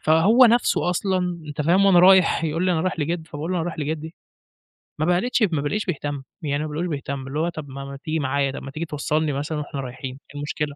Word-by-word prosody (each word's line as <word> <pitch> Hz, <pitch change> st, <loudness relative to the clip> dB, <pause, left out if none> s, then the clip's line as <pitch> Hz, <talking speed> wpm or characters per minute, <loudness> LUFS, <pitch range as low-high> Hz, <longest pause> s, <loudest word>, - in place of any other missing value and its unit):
فهو 165 Hz, +9 st, +4 dB
نفسه 235 Hz, -6 st, +3 dB
أصلًا 180 Hz, -2 st, -1 dB
أنت 150 Hz, +1 st, -3 dB
فاهم 180 Hz, +6 st, +4 dB
وأنا 185 Hz, -3 st, +6 dB
رايح 185 Hz, -2 st, +6 dB
يقول 165 Hz, +3 st, -1 dB
لي 185 Hz, -, +2 dB
أنا 160 Hz, -, +1 dB
رايح 185 Hz, 0 st, -2 dB
لجد 160 Hz, +2 st, -2 dB
فباقول 150 Hz, +4 st, -5 dB
له: 185 Hz, -, 0 dB
"أنا 165 Hz, -, -1 dB
رايح 175 Hz, -2 st, -5 dB
لجدي" 155 Hz, +2 st, -4 dB, 0.9 s
ما 155 Hz, -, +1 dB
بقلتش 200 Hz, +7 st, +2 dB
ما 150 Hz, -, 0 dB
بالاقيش 205 Hz, +9 st, -1 dB
بيهتم 145 Hz, -5 st, -3 dB, 0.2 s
يعني، 145 Hz, -1 st, -1 dB
ما 155 Hz, -, -4 dB
بالاقيهوش 165 Hz, +4 st, -3 dB
بيهتم، 140 Hz, -1 st, -5 dB
اللي 140 Hz, +3 st, -3 dB
هو 170 Hz, +2 st, +1 dB
طَب 155 Hz, -4 st, -8 dB
ما 135 Hz, +1 st, -7 dB
ما 140 Hz, 0 st, -7 dB
تيجي 160 Hz, 0 st, -1 dB
معايا 140 Hz, -1 st, 0 dB
طَب -, -, -7 dB
ما 140 Hz, -, -7 dB
تيجي 160 Hz, +4 st, -4 dB
توصلني 150 Hz, 0 st, -1 dB
مثلًا 150 Hz, +3 st, -3 dB
وإحنا 145 Hz, -1 st, -5 dB
رايحين 130 Hz, +1 st, -7 dB
إيه 145 Hz, -, -11 dB
المشكلة، 145 Hz, 0 st, -3 dB
155 Hz, 235 wpm, -23 LUFS, 145-175 Hz, 0.9 s, وأنا